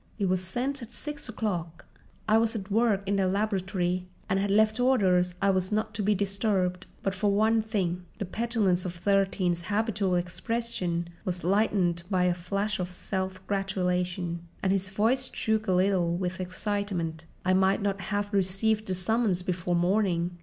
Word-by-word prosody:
"It 205 Hz, -, 0 dB
was 185 Hz, 0 st, +1 dB
sent 255 Hz, +9 st, -2 dB
at 235 Hz, -, -8 dB
six 290 Hz, +1 st, -6 dB
o'clock." 175 Hz, -7 st, -3 dB, 0.4 s
"I 220 Hz, +1 st, +5 dB
was 230 Hz, 0 st, +1 dB
at 200 Hz, -2 st, -5 dB
work 215 Hz, -2 st, +3 dB
in 200 Hz, 0 st, +1 dB
the 190 Hz, -1 st, +2 dB
laboratory 185 Hz, -2 st, 0 dB, 0.2 s
and 195 Hz, -, +1 dB
had 200 Hz, +1 st, 0 dB
left 215 Hz, +3 st, +3 dB
orders 185 Hz, -9 st, +3 dB
I 200 Hz, -, +5 dB
was 185 Hz, 0 st, 0 dB
not 215 Hz, +1 st, 0 dB
to 210 Hz, -, -3 dB
be 205 Hz, +1 st, +2 dB
disturbed. 195 Hz, -2 st, 0 dB, 0.2 s
But 195 Hz, -, 0 dB
for 200 Hz, +1 st, +1 dB
one 220 Hz, +2 st, +3 dB
thing"—the 185 Hz, -3 st, -3 dB
petulance 205 Hz, -3 st, 0 dB
of 180 Hz, -1 st, -4 dB
Thirteen's 190 Hz, -1 st, +1 dB
habitual 205 Hz, -2 st, 0 dB
expression 180 Hz, -1 st, -2 dB, 0.2 s
was 180 Hz, -1 st, -3 dB
lightened 185 Hz, -2 st, +2 dB
by 185 Hz, -3 st, +2 dB
a 180 Hz, -1 st, +3 dB
flash 195 Hz, +4 st, -2 dB
of 180 Hz, 0 st, -3 dB
self 190 Hz, 0 st, -4 dB
gratulation, 180 Hz, -3 st, -1 dB, 0.2 s
and 190 Hz, -, +2 dB
his 195 Hz, -1 st, +1 dB
voice 235 Hz, +7 st, +1 dB
shook 220 Hz, 0 st, 0 dB
a -, -, +2 dB
little 180 Hz, -2 st, +2 dB
with 185 Hz, 0 st, -3 dB
excitement—"I 180 Hz, -3 st, -2 dB
might 190 Hz, +1 st, +3 dB
not 200 Hz, -1 st, -1 dB
have 205 Hz, +2 st, -2 dB
received 200 Hz, +3 st, +1 dB
the 185 Hz, -, -1 dB
summons 195 Hz, -1 st, +1 dB
before 180 Hz, -1 st, -1 dB
morning." 175 Hz, -1 st, +1 dB
195 Hz, 165 wpm, -28 LUFS, 180-210 Hz, 0.4 s, I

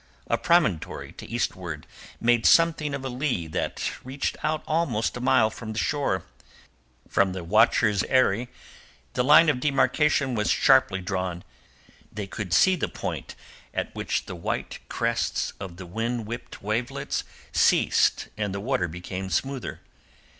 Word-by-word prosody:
A -, -, +1 dB
promontory 155 Hz, -, +1 dB
to -, -, -11 dB
eastward 90 Hz, -9 st, -3 dB, 0.3 s
made 120 Hz, -1 st, +3 dB
something 155 Hz, -3 st, +4 dB
of 135 Hz, -1 st, -6 dB
a -, -, -1 dB
lee 125 Hz, -, -1 dB
that 80 Hz, -, -2 dB
reached 135 Hz, +2 st, -3 dB
out 155 Hz, 0 st, 0 dB
almost 155 Hz, -9 st, 0 dB
a 125 Hz, -, -5 dB
mile 110 Hz, -3 st, +4 dB
from 110 Hz, 0 st, -7 dB
shore. 110 Hz, -4 st, 0 dB, 0.8 s
From 95 Hz, -1 st, +2 dB
the 95 Hz, -2 st, -5 dB
watcher's 105 Hz, +1 st, +3 dB
eyrie 125 Hz, -2 st, +2 dB, 0.6 s
the -, -, +1 dB
line 150 Hz, +5 st, +7 dB
of 145 Hz, -5 st, +2 dB
demarcation 140 Hz, 0 st, +2 dB
was 105 Hz, -2 st, 0 dB
sharply 130 Hz, -9 st, +4 dB
drawn; 90 Hz, -2 st, -3 dB, 0.7 s
they 105 Hz, -1 st, -5 dB
could 95 Hz, -1 st, -6 dB
see 190 Hz, -, +5 dB
the 175 Hz, -, -1 dB
point -, -, -5 dB, 0.4 s
at -, -, -2 dB
which -, -, -2 dB
the -, -, -7 dB
white 85 Hz, -, -4 dB
crests -, -, -1 dB
of 90 Hz, -3 st, -7 dB
the 95 Hz, -, -8 dB
wind 115 Hz, +5 st, -3 dB
whipped 115 Hz, -1 st, -8 dB
wavelets 110 Hz, +4 st, -2 dB, 0.3 s
ceased -, -, +3 dB
and 105 Hz, -2 st, -2 dB
the -, -, -3 dB
water 125 Hz, -1 st, 0 dB
became 90 Hz, +3 st, -6 dB
smoother. 135 Hz, -, -2 dB
115 Hz, 145 wpm, -26 LUFS, 95-135 Hz, 0.8 s, line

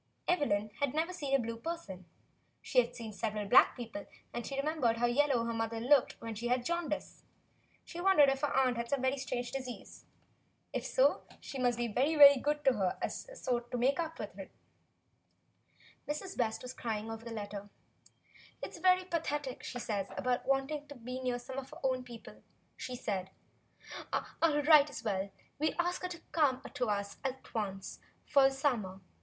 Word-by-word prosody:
Evelyn 215 Hz, -, +1 dB
had 285 Hz, -1 st, 0 dB
never 330 Hz, +4 st, 0 dB
seen 280 Hz, -6 st, 0 dB
a -, -, +4 dB
blue 230 Hz, -1 st, -3 dB
person. 230 Hz, -, -6 dB, 0.6 s
She 255 Hz, -, +3 dB
had 245 Hz, 0 st, +1 dB
seen 225 Hz, -3 st, -7 dB
several 210 Hz, -1 st, -2 dB
black 245 Hz, -, +6 dB
people, 230 Hz, -4 st, -7 dB, 0.3 s
and 240 Hz, -, -4 dB
she 275 Hz, -, -4 dB
remembered 275 Hz, -5 st, +1 dB
how 240 Hz, -, +2 dB
yellow 250 Hz, -1 st, +2 dB
her 230 Hz, -, -2 dB
mother 225 Hz, 0 st, -2 dB
had 225 Hz, +1 st, -4 dB
looked 285 Hz, -3 st, +6 dB
when 230 Hz, -1 st, -5 dB
she 230 Hz, +3 st, -4 dB
had 250 Hz, +1 st, +2 dB
the -, -, -14 dB
jaundice. 335 Hz, -1 st, -3 dB, 0.6 s
She 345 Hz, -, -7 dB
wondered 365 Hz, -7 st, +6 dB
if 270 Hz, 0 st, +1 dB
her 290 Hz, -, +1 dB
aunt 255 Hz, -2 st, +2 dB
had 235 Hz, 0 st, -3 dB
some 270 Hz, -2 st, 0 dB
strange 245 Hz, -2 st, -3 dB
disease. 255 Hz, -3 st, -7 dB, 0.7 s
If -, -, -2 dB
so, -, -, +3 dB, 0.2 s
she 275 Hz, -, -7 dB
must 245 Hz, -2 st, +2 dB
be 240 Hz, 0 st, 0 dB
very, 270 Hz, +8 st, +1 dB
very 285 Hz, -2 st, +10 dB
good 295 Hz, +2 st, -1 dB
to 265 Hz, -, +6 dB
her 190 Hz, -5 st, 0 dB
so -, -, -7 dB
as -, -, -12 dB, 0.3 s
to 245 Hz, -, -2 dB
make 265 Hz, +6 st, +2 dB
up 325 Hz, -1 st, -2 dB
for -, -, -4 dB
it. -, -, -8 dB, 1.6 s
Mrs. 335 Hz, +6 st, -4 dB
West 225 Hz, -2 st, -1 dB
was 250 Hz, 0 st, -6 dB
crying 225 Hz, -2 st, -3 dB
over 225 Hz, 0 st, -7 dB
the 235 Hz, -, -7 dB
letter. 205 Hz, -2 st, -6 dB, 0.9 s
"It -, -, -3 dB
is -, -, -10 dB
very 370 Hz, 0 st, +4 dB
pathetic 295 Hz, -6 st, -2 dB
what -, -, -11 dB
she 245 Hz, -, -5 dB
says 205 Hz, -5 st, -2 dB
about 250 Hz, -1 st, 0 dB
wanting 275 Hz, +2 st, 0 dB
to 285 Hz, -, -10 dB
be 250 Hz, +1 st, -6 dB
near 250 Hz, -1 st, 0 dB
some 260 Hz, +2 st, -6 dB
of 265 Hz, -, -9 dB
her -, -, -11 dB
own 260 Hz, -1 st, +1 dB
people," 235 Hz, -2 st, -11 dB, 0.3 s
she 250 Hz, -, -5 dB
said. 195 Hz, -6 st, -3 dB, 0.8 s
"I'll 300 Hz, -3 st, +1 dB
write 300 Hz, -1 st, +7 dB
as 265 Hz, -, -7 dB
well 210 Hz, -4 st, 0 dB
as -, -, 0 dB
you, -, -, -3 dB
and 200 Hz, -, -16 dB, 0.3 s
we'll 310 Hz, +1 st, +1 dB
ask 355 Hz, +1 st, -2 dB
her 365 Hz, -, -2 dB
to 345 Hz, -2 st, -8 dB
come 285 Hz, -6 st, +3 dB
to 245 Hz, -, -1 dB
us 200 Hz, -1 st, -2 dB
at 265 Hz, -1 st, -5 dB
once 195 Hz, -4 st, -4 dB, 0.3 s
for 275 Hz, -2 st, +5 dB
the 270 Hz, -, -7 dB
summer. 230 Hz, -9 st, 0 dB
255 Hz, 200 wpm, -33 LUFS, 230-290 Hz, 1.6 s, very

